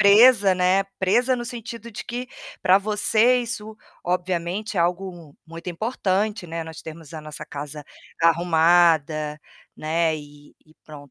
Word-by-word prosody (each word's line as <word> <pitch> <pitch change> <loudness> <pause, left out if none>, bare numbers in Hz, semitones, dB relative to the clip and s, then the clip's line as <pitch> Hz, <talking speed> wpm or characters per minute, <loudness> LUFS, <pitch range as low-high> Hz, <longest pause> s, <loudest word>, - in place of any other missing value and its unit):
presa, 205 -1 +7
né, 185 +2 +3 0.2
presa 240 +7 +3
no 240 - -4
sentido 235 -1 -7
de 215 - -7
que 245 +2 -5 0.3
pra 185 +2 +6
você 215 +4 +3
isso, 220 -2 -5 0.3
obviamente, 180 +3 -2
é - - +3
algo 175 -3 -2
muito 165 +2 -9
importante, 210 0 -1
né, 165 0 -4
nós 160 0 -9
termos 160 -1 -10
a 160 - -6
nossa 150 0 -8
casa 145 0 -7 0.4
arrumada, 165 -2 +3 0.4
né, 160 0 0
e 145 0 -14
e 155 - -23
pronto. 145 -3 -12
180 Hz, 140 wpm, -23 LUFS, 160-215 Hz, 0.4 s, presa